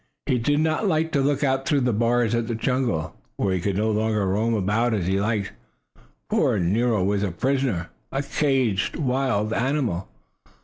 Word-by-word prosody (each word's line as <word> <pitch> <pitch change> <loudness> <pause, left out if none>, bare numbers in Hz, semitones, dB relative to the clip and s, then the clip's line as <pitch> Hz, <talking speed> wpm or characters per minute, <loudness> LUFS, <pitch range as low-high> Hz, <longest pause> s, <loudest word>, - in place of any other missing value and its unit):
He 125 - +1
did 145 +5 +1
not 160 +6 +1
like 160 -2 +1
to 140 - +1
look 140 +1 +1
out 135 -1 0
through 145 -2 +2
the 125 -2 +1
bars 120 +1 +1
at 115 -1 0
the 120 - -2
jungle, 120 -9 -1 0.2
when 95 -2 0
he 90 - -1
could 100 +1 -1
no 110 +1 +1
longer 105 -1 0
roam 110 +5 +1
about 110 +4 +1
as 95 -5 -2
he 95 +2 +1
liked. 105 -2 -1 0.8
Poor - - +2
Nero 105 +4 +1
was 100 +1 +1
a 100 - 0
prisoner 125 -1 -1 0.2
a 135 +1 -1
caged 130 -11 0
wild 130 -7 0
animal. 125 - -1
115 Hz, 180 wpm, -24 LUFS, 100-135 Hz, 0.8 s, through